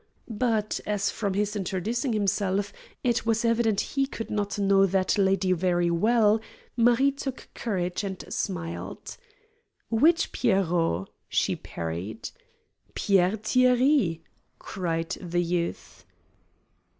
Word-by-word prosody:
But, 225 -2 -1
as 205 -1 0
from 200 -3 -2
his 210 +1 0
introducing 210 - -2
himself 200 -1 0 0.3
it 240 -2 +1
was 225 0 +1
evident 230 -3 +2
he 275 -1 +1
could 225 -4 -6
not 205 -1 -2
know 195 -1 +4
that 190 0 +1
lady 195 -2 +2
very 175 -1 +1
well, 215 +4 +3 0.3
Marie 240 +4 +4
took 270 -1 -6
courage 180 -4 -2
and 190 -2 -5
smiled. 175 -4 -4 0.7
"Which 310 +9 +3
'Pierrot'?" 175 - +1 0.2
she - - +1
parried. 85 +5 -6 0.6
"Pierre 195 +1 +2
Thierry!" 250 - +3 0.3
cried 165 -4 -3
the 175 -1 -1
youth. 170 - -3
200 Hz, 110 wpm, -26 LUFS, 180-230 Hz, 0.7 s, know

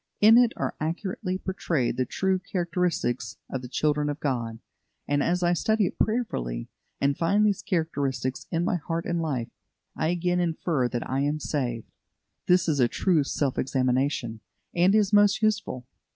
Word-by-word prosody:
In 220 +2 +7
it 240 -1 +6
are - - -2
accurately 185 +3 -2
portrayed 165 -10 -1
the 130 0 -1
true 190 -1 0
characteristics 170 - -1
of 130 - -3
the 125 - -7
children 150 +3 0
of 145 +1 -4
God; 120 -7 -2 0.5
and 145 0 +1
as 175 +4 +1
I 175 0 +3
study 220 +4 +2
it - - -5
prayerfully, - - -1 0.3
and 140 0 +2
find 200 +7 +2
these 205 -2 +1
characteristics 140 - -2
in 170 0 0
my 185 - +1
heart 165 +1 -3
and 170 -1 -1
life, 135 -8 -2 0.5
I - - 0
again 175 +1 0
infer 165 -5 0
that 120 -1 -4
I 130 - -1
am 145 +2 0
saved. 125 -7 -3 0.6
This 180 -1 +4
is 145 -4 +2
true 170 -1 +2
self 140 -1 -1
examination, 130 -3 0 0.3
and 180 +4 +4
is 210 -1 +2
most 205 +1 +5
useful. 205 - 0
160 Hz, 165 wpm, -26 LUFS, 130-185 Hz, 0.6 s, In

